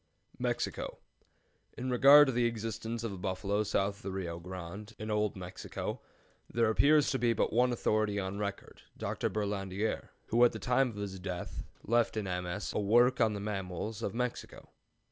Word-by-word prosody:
MEXICO. - - -2 0.8
In 130 +1 -2
regard 140 +4 +9
to 135 - 0
the 120 0 +2
existence 115 0 -4
of 115 - -2
the 95 - -7
bison 100 +2 -1
south 100 -1 0
of - - -17
the 95 - -4
Rio 85 -3 -4
Grande, 95 +5 -8
in 110 0 -5
old 105 -1 +1
Mexico, 90 -1 -5 0.5
there 115 -1 +2
appears 145 +5 +4
to 130 - 0
be 120 -1 +3
but 105 - 0
one 125 +2 +4
authority 110 -3 +1
on 95 +1 -3
record, 100 -1 -5 0.2
Dr. - - -2
Berlandier, 100 0 -2 0.2
who 120 +2 +4
at 120 - +5
the - - -4
time 125 +1 +2
of 115 - -9
his 100 -2 -5
death 90 -1 -5 0.2
left 115 0 +2
in 110 - 0
MS. 90 +2 -3
a - - 0
work 120 +5 +4
on 110 -2 +4
the 100 - -4
mammals 100 +1 -4
of 100 -2 -3
Mexico. 125 0 -4
105 Hz, 180 wpm, -32 LUFS, 95-115 Hz, 0.8 s, regard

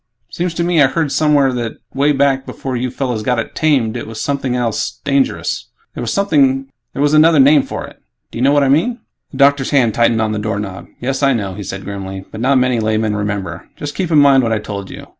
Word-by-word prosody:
Seems 175 -1 -3
to 170 - 0
me 170 -2 +2
I 140 - +6
heard 150 +1 -1
somewhere 145 -4 +3
that, 120 -2 -3 0.2
way 140 +2 +2
back 135 -1 +1
before 130 -1 -5
you 125 +1 -2
fellows 125 -3 -3
got 125 +2 0
it 115 - -4
'tamed' 135 -8 +1
it 120 - -5
was 110 -1 -8
something 135 -3 -2
else 120 -3 -2
dangerous. 140 -2 -1 0.3
There - - -6
was 135 - 0
another 155 0 +5
name 140 +2 +6
for - - -6
it. - - -15 0.3
Do - - -7
you - - 0
know 140 - +4
what 145 -1 +3
I - - +2
mean?" 175 - +2 0.3
The 135 - -10
doctor's 140 -1 +3
hand 125 -6 +2
tightened 115 -1 +2
on 110 -1 0
the 105 - -2
doorknob. 105 -3 -4
"Yes, 135 +2 -2
I 140 -1 +3
know," 100 -5 -3
he 105 - -8
said 95 0 -6
grimly, 95 -1 -6
"but 110 - -7
not 135 +2 +3
many 125 -2 +2
laymen 110 -1 0
remember. 100 -5 -4
Just 145 0 -6
keep 185 -3 -2
in 160 - +3
mind 140 -2 +6
what 115 -2 -1
I 110 - +2
told 100 -2 -6
you. - - -9
130 Hz, 230 wpm, -17 LUFS, 110-145 Hz, 0.3 s, I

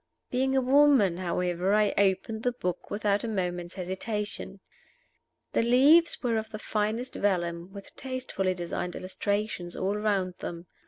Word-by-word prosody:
Being 265 +1 +1
a - - +4
woman, 260 -8 +5
however, 180 +1 0
I 210 -1 +3
opened 200 +3 +1
the 245 - +1
book 180 -7 -4
without 205 -1 0
a - - -2
moment's 180 -4 -3
hesitation. 195 +1 -4 0.9
The - - +3
leaves 275 +10 +5
were 235 -2 +1
of 220 0 -3
the 220 - -6
finest 220 +4 -2
vellum, 175 -2 -1
with 200 0 -11
tastefully 255 -8 -2
designed 175 0 -4
illuminations 200 -1 -3
all 195 +2 -1
round 200 -3 0
them. 170 0 -6
205 Hz, 145 wpm, -28 LUFS, 185-230 Hz, 0.9 s, woman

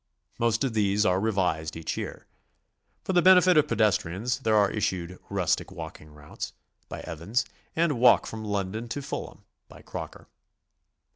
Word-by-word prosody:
Most 115 0 +2
of 130 -4 -1
these 105 -1 +2
are 90 -2 +3
revised 90 -7 0
each 80 0 -4
year. - - -6 0.8
For 190 - -2
the 175 - +5
benefit 185 0 +7
of 150 - +5
pedestrians 105 +2 +1
there 110 -4 +1
are 100 -2 +4
issued 90 -4 -2
"Rustic - - 0
Walking 80 -3 -9
Routes," 75 0 -8 0.4
by - - -6
Evans, 100 +10 -2 0.3
and 160 -6 +1
"Walk 125 - +6
from 110 -1 -6
Lon 100 -3 -2
don 110 +3 -5
to 145 +5 -4
Fulham," - - -6 0.2
by - - -15
Crocker. - - -8
105 Hz, 155 wpm, -27 LUFS, 90-120 Hz, 0.8 s, benefit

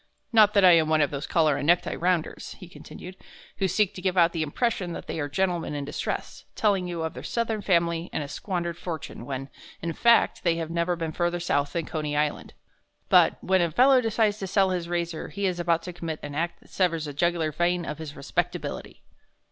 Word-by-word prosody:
"Not 215 -2 +6
that 200 -2 +6
I 180 - +9
am 160 -2 +4
one 155 -1 +3
of 145 - +2
those 140 0 -4
collar 155 -4 +2
and 145 - -3
necktie 175 +1 +3
rounders," 175 -2 -1
he 185 - -10
continued, 180 0 -11 0.4
"who 195 - +1
seek 195 +2 +1
to 185 - -8
give 185 0 -1
out 170 -1 +5
the 165 - -3
impression 180 - -1
that - - -7
they - - -4
are 145 -1 -2
gentlemen 175 -1 -1
in 145 -1 -3
distress, 145 - -4
telling 195 -4 +1
you 170 -2 -3
of 160 - -3
their - - -8
Southern 225 -2 -2
family 170 -3 +1
and 150 - -2
a - - -6
squandered 170 +1 -4
fortune 160 -8 -6
when, 135 0 -4 0.3
in 165 0 -3
fact, 235 +1 +3
they 170 -2 +2
have 165 -1 -4
never 170 +1 0
been 165 -2 -3
further 175 +2 -1
South 145 -4 0
than 170 -3 -2
Coney 150 -3 -3
Island.... 150 0 -2 0.5
But - - +5
when 190 0 +3
a 170 - +2
fellow 255 - +5
decides 220 -2 +1
to 195 - -4
sell 190 0 +2
his 175 -2 -3
razor 170 -2 -2
he 200 0 -3
is 180 -2 -1
about 170 -1 +1
to 180 - -6
commit 165 -2 -5
an 145 - -6
act 170 +4 -3
that - - -22
severs 170 -4 0
the 145 - -6
jugular 165 +1 0
vein 175 +2 0
of 150 0 -5
his 155 -2 -7
respectability. 140 - -4
170 Hz, 220 wpm, -26 LUFS, 160-185 Hz, 0.5 s, I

